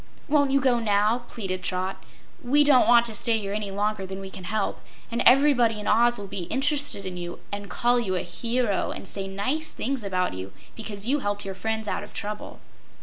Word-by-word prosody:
"Won't 285 -2 +3
you 275 +1 +3
go 255 -3 +3
now?" 215 +2 +2
pleaded 185 -4 -4
Trot. 185 +1 -3 0.4
"We 285 +4 +4
don't 285 -3 +5
want 240 0 +6
to 230 - -4
stay 225 +1 +1
here 200 -2 -4
any 210 -1 -3
longer 205 +1 -1
than 190 0 -6
we 195 0 -8
can 185 - -8
help, 215 +1 -2 0.3
and 235 +1 0
everybody 250 -5 +5
in 210 - -6
Oz 240 +2 +4
will 205 - -6
be 185 -2 -4
interested 275 - -1
in 185 -1 -4
you, 175 0 -5
and 205 -1 -5
call 245 +4 +2
you 190 -6 -1
a 180 - 0
hero, 235 -3 -1
and - - -6
say 195 0 -4
nice 255 +12 -2
things 265 -1 -2
about 185 -2 0
you 95 +1 -7 0.2
because 210 -3 -5
you 280 +5 +2
helped 205 -4 -2
your 195 - -4
friends 220 +3 -3
out - - -1
of - - -11
trouble." 210 +1 -5
215 Hz, 210 wpm, -26 LUFS, 195-245 Hz, 0.4 s, want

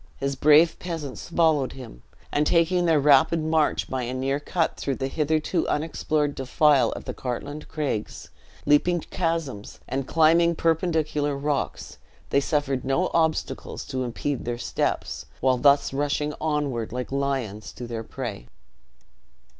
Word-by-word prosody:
His 140 0 -2
brave 155 +4 +5
peasants 165 -6 -6
followed 160 -5 +2
him; 120 - -11 0.3
and 150 +1 +1
taking 175 +1 +3
their 160 -3 +4
rapid 145 +3 +5
march 155 -1 +1
by 130 -1 -3
a 125 +1 -3
near 135 +2 -1
cut 165 +3 -1
through 135 -2 -3
a 135 - -1
hitherto 155 +4 0
unexplored 150 -1 0
defile 135 -1 +3
of - - -8
the - - -4
Cartlane 140 +4 -5
Craigs, 140 -9 -4 0.4
leaping 170 +4 +3
chasms, 165 - -3
and 135 +1 -3
climbing 165 +2 +4
perpendicular 155 -3 0
rocks, 145 0 -3 0.3
they - - +4
suffered 140 -3 -1
no 150 +8 0
obstacles 160 -1 -1
to 130 -1 -3
impede 125 +3 -3
their 120 0 -3
steps, - - -2
while 130 -1 +2
thus 140 0 +4
rushing 145 +1 -1
onward 145 -7 -1
like 125 +2 -4
lions 135 -7 -2
to 120 - -7
their 115 -1 -5
prey. 115 - -6
145 Hz, 140 wpm, -25 LUFS, 130-160 Hz, 0.4 s, brave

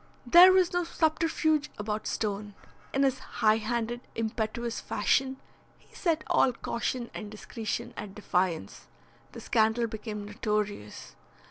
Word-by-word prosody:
There, 350 +9 +9
was 370 -2 +3
no 355 0 +1
subterfuge 315 -2 +1
about 210 +1 -3
Stone. 205 -1 -3 0.4
In 275 - +2
his 265 -1 +2
high 215 0 +2
handed, 235 +2 -2
impetuous 225 +1 -2
fashion, 265 +5 +1 0.4
he - - -26
set 330 -4 0
all 255 - +3
caution 235 +1 -3
and 210 -1 -6
discretion 225 +3 -5
at 205 -1 -7
defiance. 180 - -1 0.5
The - - -8
scandal 220 +1 +2
became 215 -2 -5
notorious. 210 - -3
225 Hz, 125 wpm, -29 LUFS, 210-265 Hz, 0.5 s, There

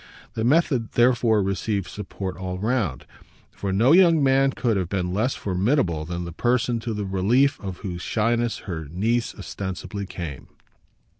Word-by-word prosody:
The 110 - -2
method 130 -3 +2
therefore 120 -3 +3
received 95 0 -1
support 95 -2 -6
all 95 -1 -5
round, 105 - -1 0.5
for 100 - -4
no 115 +8 +4
young 165 -3 +6
man 135 0 +4
could 120 -4 0
have 90 -3 -1
been 90 -2 -1
less 110 +7 0
formidable 95 - 0
than 85 +1 -4
the 85 - -6
person 120 +5 +1
to 115 -1 -4
the 105 -1 -3
relief 110 +9 +2
of 95 -3 -6
whose 90 -2 -4
shyness 115 +2 0
her 80 -5 -4
niece 110 +10 -1
ostensibly 100 0 -5
came. 85 -7 -7
105 Hz, 155 wpm, -24 LUFS, 95-120 Hz, 0.5 s, young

